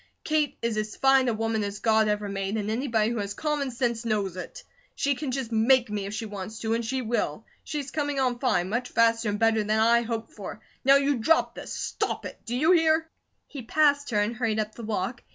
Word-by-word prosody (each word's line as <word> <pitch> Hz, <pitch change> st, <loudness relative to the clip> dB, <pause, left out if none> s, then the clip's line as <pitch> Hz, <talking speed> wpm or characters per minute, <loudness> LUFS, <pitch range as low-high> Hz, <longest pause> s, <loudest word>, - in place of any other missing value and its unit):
Kate 305 Hz, -2 st, 0 dB
is 230 Hz, -2 st, 0 dB
as 215 Hz, 0 st, -3 dB
fine 270 Hz, -1 st, +4 dB
a 235 Hz, -, +2 dB
woman 225 Hz, -1 st, -1 dB
as 200 Hz, 0 st, -4 dB
God 220 Hz, 0 st, +3 dB
ever 210 Hz, 0 st, -1 dB
made, 195 Hz, +1 st, -2 dB
and 210 Hz, 0 st, -2 dB
anybody 230 Hz, -2 st, +1 dB
who 235 Hz, -, -2 dB
has 200 Hz, 0 st, -4 dB
common 300 Hz, -3 st, -1 dB
sense 235 Hz, -2 st, -1 dB
knows 205 Hz, -5 st, -1 dB
it. 185 Hz, -, -8 dB, 0.3 s
She 280 Hz, -, +1 dB
can 280 Hz, +1 st, -4 dB
just 255 Hz, -2 st, -3 dB
MAKE 235 Hz, +1 st, +3 dB
me, 205 Hz, -2 st, -2 dB
if 200 Hz, -, -6 dB
she 225 Hz, -, -4 dB
wants 205 Hz, 0 st, -7 dB
to, 225 Hz, 0 st, 0 dB
and 230 Hz, +1 st, 0 dB
she 255 Hz, +3 st, -2 dB
will; 235 Hz, +1 st, -2 dB, 0.2 s
she's 290 Hz, -3 st, -4 dB
coming 290 Hz, -2 st, -1 dB
on 250 Hz, -2 st, 0 dB
fine, 200 Hz, -9 st, +1 dB
much 240 Hz, +5 st, -2 dB
faster 230 Hz, -1 st, +2 dB
and 205 Hz, -, -1 dB
better 225 Hz, 0 st, +3 dB
than 215 Hz, +1 st, +1 dB
I 230 Hz, +2 st, +4 dB
hoped 225 Hz, -1 st, -4 dB
for. 210 Hz, 0 st, -8 dB, 0.2 s
Now 275 Hz, +1 st, +7 dB
you 280 Hz, -1 st, +2 dB
drop 320 Hz, +9 st, +2 dB
this! -, -, -8 dB
Stop -, -, -3 dB
it! -, -, -8 dB
Do 240 Hz, -, -2 dB
you 310 Hz, +7 st, +3 dB
hear?" 320 Hz, -2 st, +3 dB, 0.4 s
He 280 Hz, -, -8 dB
passed 285 Hz, +3 st, +2 dB
her 210 Hz, -4 st, +1 dB
and 210 Hz, +3 st, 0 dB
hurried 225 Hz, -3 st, 0 dB
up 215 Hz, 0 st, -2 dB
the -, -, -10 dB
walk. 215 Hz, +2 st, -3 dB
230 Hz, 230 wpm, -26 LUFS, 215-265 Hz, 0.4 s, Now